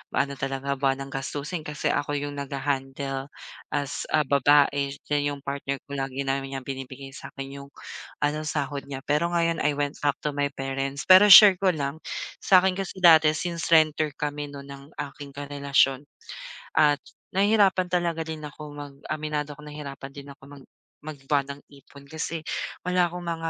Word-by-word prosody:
ano 140 0 +1
talaga 135 0 -3
buwanang 135 0 -1
gastusin. 150 +4 -4
Kasi 150 0 -1
ako 145 0 -1
yung 145 0 -3
nagha-handle 135 0 -3 0.4
as, 145 -1 -3
ah, 155 - +2
babae 140 0 +3 0.2
then 145 0 +2
'yong 140 -1 -5
partner 140 0 -3
ko 140 -1 -6
lagi 135 0 -3
naman 135 0 -1
niyang 135 -1 -6
binibigay 135 0 -7
sa - - -9
akin 135 0 -8
yung 140 - -10 0.6
ano, 150 +1 0
sahod 140 -2 -3
niya, 135 -1 -7
pero 150 +3 +1
ngayon 165 -1 +1
I 150 -1 +1
went 145 0 -2
back 145 -1 +1
to 150 - 0
my 145 0 0
parents. 135 +1 -3
Pero 185 +2 +8
share 195 -2 +10
ko 190 -1 +3
lang, 140 +1 -3 0.4
sa 185 -1 +5
akin 190 - +3
kasi 190 -1 -6
dati 160 -2 +7
since 170 0 -3
renter 155 -2 +3
kami 145 0 -3
no'n 140 -1 -9
ng 140 0 -10 0.3
aking 140 -1 -11
karelasyon 140 -1 +1 0.7
at 150 -2 +4 0.3
nahihirapan 195 -2 +3
talaga 170 -2 0
din 160 -1 -6
ako 150 +1 -10
mag 145 -1 -8 0.2
aminado 150 -1 -3
ako 150 - -13
nahirapan 140 -2 -8
din 140 0 -10
ako 135 - -17
mag 140 -2 -13 0.3
mag-buwanang 140 -1 -3
ipon 140 0 -16
kasi 160 +1 -4 0.4
wala 180 -1 +2
akong 175 +1 -7
mga 165 -1 -3
145 Hz, 170 wpm, -26 LUFS, 140-155 Hz, 0.7 s, share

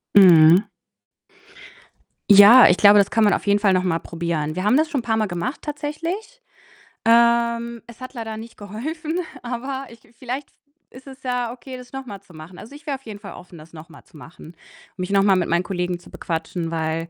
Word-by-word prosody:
Mhm. 175 -1 +7 1.6
Ja, 205 +5 +9
ich - - +3
glaube, 205 0 +6
das 200 - +2
kann 225 - +2
man 205 - +4
auf - - -3
jeden 205 0 +3
Fall 200 -2 +2
noch 185 0 +1
mal 170 -3 -1
probieren. 165 -2 -4
Wir 185 - -3
haben 215 +6 +3
das 315 +1 +1
schon 280 -6 -2
paarmal 220 -2 -1
gemacht 175 - -5
tatsächlich. 330 +11 -6 0.6
Ähm, 235 0 +2
es 235 +1 -15
hat 255 - -9
leider 225 -3 -6
nicht 225 +1 -11
geholfen, 305 - -5 0.2
aber 265 +3 -5
ich 230 0 -15 0.2
vielleicht 260 +3 -6
v - - -38 0.4
ist 255 +2 -15
es 265 -1 -13
ja 250 -2 -2
okay, 255 +1 -10
das 250 -1 -13
noch 270 0 -7
mal 200 -5 -9
zu 200 -3 -20
machen. 160 +3 -12
Also, 225 - -12
ich 290 +1 -14
wäre 285 - -1
auf 270 - -29
jeden 210 -3 -9
Fall 200 -1 -10
offen, 180 -1 -14
das 155 +1 -16
noch 160 0 -12
mal 165 - -16
zu - - -24
machen, 165 +2 -14 0.4
mich 180 0 -4
noch 195 0 +3
mal 195 -1 +4
mit 180 - -1
meinen 170 +2 +1
Kollegen 180 -1 -3
zu - - -17
bequatschen, 165 0 -5
weil, 165 0 -3
215 Hz, 210 wpm, -21 LUFS, 180-255 Hz, 1.6 s, Ja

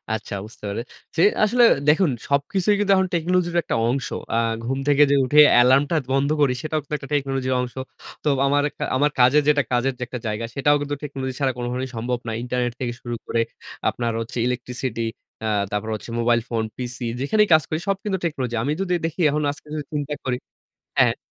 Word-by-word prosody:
আচ্ছা 105 -1 -6
বুঝতে 110 - -15
পেরেছি। 120 +9 -5 0.2
আসলে 240 +3 +4 0.2
দেখুন 160 +2 +4 0.2
সবকিছুই 175 +9 +2
কিন্তু 205 -1 +2
এখন 190 0 +2
টেকনোলজির 175 +1 0
একটা - - -2
অংশ। 130 +2 -1 0.3
আ - - +2 0.3
ঘুম 135 +3 -2
থেকে 145 0 +6
যে - - +5
উঠে 145 +4 +4 0.2
এলার্মটা 135 +5 +4 0.2
বন্ধ 135 +1 +2
করি, 135 -3 +4
সেটাও 155 0 -1
কিন্তু 150 +1 -4
একটা 135 - -11
টেকনোলজির 135 -2 0
অংশ। 125 -1 -5 0.5
তো - - -2 0.2
আমার 145 +1 +3
একটা - - -7
আমার 145 +2 +2
কাজের 130 +5 +6
যেটা 145 -1 +4
কাজের 125 +2 +1
যে - - -2
একটা 125 - -6
জায়গা, 110 +2 -2
সেটাও 145 +1 +3
কিন্তু 145 0 -2
টেকনোলজি 135 -3 -4
ছাড়া 135 -2 +2
কোন 120 - -3
ভাবেই 130 +1 -3
সম্ভব 120 +2 -2
না। 115 - -1
ইন্টারনেট 125 -1 -1
থেকে 120 -2 -2
শুরু 120 -1 -4
করে, 115 - 0 0.5
আপনার 120 -1 -2
হচ্ছে 120 +2 -6
ইলেকট্রিসিটি, 125 -1 -3 0.4
অ্যা 110 - -2 0.2
তারপর 105 +2 -2
হচ্ছে 110 - -9
মোবাইল 120 0 +3
ফোন, 115 -2 0
পিসি, 125 -1 -5
যেখানেই 210 +10 +3
কাজ 155 -1 +6
করি 155 - -1
সব 195 - +2
কিন্তু 200 -3 -1
টেকনোলজি। 130 -7 -2
আমি 145 - 0
যদি 180 -2 0
দেখি 165 +2 -4
এখন 150 +1 0
আজকে 150 +1 -14
যদি 150 -1 -3
চিন্তা 150 0 -2
করি 125 -1 0 0.6
হ্যাঁ। - - +4
135 Hz, 195 wpm, -23 LUFS, 125-150 Hz, 0.6 s, থেকে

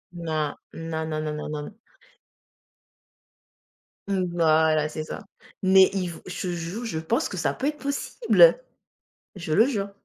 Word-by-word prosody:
Non, 155 -3 -2 0.2
non, 160 -1 -4
non, 155 -1 -2
non, 155 -1 -3
non, 150 - -5
non. 150 +6 -6 2.3
Mmh, 195 -2 0
voilà, 155 -2 +3
c'est 155 0 -5
ça. - - -7 0.4
Mais 190 0 +6
il 185 -3 -1
v 165 - -10
je 180 - -6
te - - -1
jure, 175 +8 -5
je 185 -9 -3
pense 230 - 0
que - - -6
ça - - 0
peut 275 - -2
être 300 0 -2
possible! 455 - +3 0.8
Je 175 -3 -5
le 220 +9 +5
jure. 200 -7 -2
170 Hz, 155 wpm, -25 LUFS, 155-205 Hz, 2.3 s, Mais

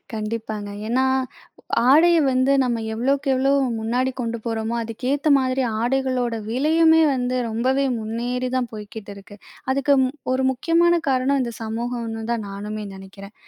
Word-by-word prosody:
கண்டிப்பாங்க. 215 -1 -4 0.2
ஏன்னா, 255 +3 +1 0.9
ஆடைய 340 +4 +6
வந்து 260 +2 +2
நம்ம 240 -2 0 0.2
எவ்வளோக்கு 275 +4 0
எவ்வளோ 265 +1 +2 0.3
முன்னாடி 250 +4 0
கொண்டு 235 -1 -3
போறோமோ, 225 0 -2
அதுக்கேத்த 260 +6 -2
மாதிரி 260 0 0 0.2
ஆடைகளோட 255 -2 0
விலையுமே 320 +6 +4
வந்து 255 0 -1
ரொம்பவே 260 +5 0
முன்னேறிதான் 245 +3 -2
போய்க்கிட்டிருக்கு. 205 -1 -10 0.4
அதுக்கு 275 +1 +2
ம் 255 - -2 0.2
ஒரு 260 0 +1
முக்கியமான 335 +6 +2
காரணம் 265 +1 +2
இந்த 235 -1 -4
சமூகம்னு 225 0 -4
தான் 220 -3 -3
நானுமே 210 +2 -5
நெனைக்கிறேன். 195 +2 -12
245 Hz, 125 wpm, -22 LUFS, 220-265 Hz, 0.9 s, ஆடைய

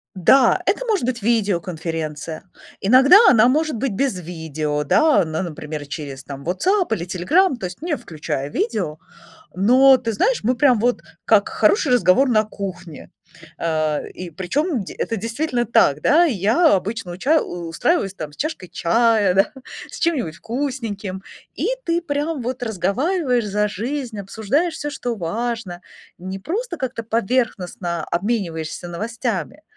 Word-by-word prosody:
Да, 250 +9 +4
это - - +1
может 420 - 0
быть 235 -4 -3
видеоконференция. 165 -7 -2 0.4
Иногда 260 - +7
она 235 0 +5
может 310 +2 +1
быть 245 -2 -2
без 255 -4 -1
видео, 155 -3 -3
да, 300 - +4
ну, 160 +2 -3
например, 150 -3 -6
через 140 -2 -7
там 140 -1 -8
WhatsApp 360 - +1
или 170 -4 -3
Telegram, 270 - +2
то 195 - -5
есть 180 +6 -7
не 330 -2 -1
включая 145 -3 -5
видео. 180 -7 -2 0.6
Но, 255 +7 +6
ты 225 - -3
знаешь, 485 - +1
мы 250 +3 +2
прям 255 -5 +4
вот 245 +1 +1 0.2
как 210 -2 +4
хороший 215 +6 +2
разговор 245 +4 +4
на 215 -2 +3
кухне. 185 -6 -8 0.5
Э, 155 -2 -1
и 180 -2 -8
причем 240 - -1
де 190 - -9
это 225 - -2
действительно 240 +3 -2
так, 150 -9 +3
да. 320 - +5
Я 235 - +3
обычно 190 -1 -3
уча 280 - +2
устраиваюсь, 180 - -1
там, 155 -5 -7
с - - -17
чашкой 305 - -4
чая, 220 0 +2
да, 195 +2 +3 0.4
с - - -9
чем-нибудь 255 - -1
вкусненьким. 225 -7 -4 0.3
И - - -2 0.2
ты 335 0 +1
прям 295 -1 -2
вот 250 +1 -4
разговариваешь 245 - 0
за 210 +1 0
жизнь, 235 +1 -4
обсуждаешь 225 - -1
всё, 295 - -4
что 245 -5 -4
важно. 205 0 -4 0.3
Не 190 +2 -6
просто 350 - -4
как-то 255 -3 -3
поверхностно 195 -7 -1
обмениваешься 175 -4 -3
новостями, 225 - -4
215 Hz, 145 wpm, -21 LUFS, 175-265 Hz, 0.6 s, Иногда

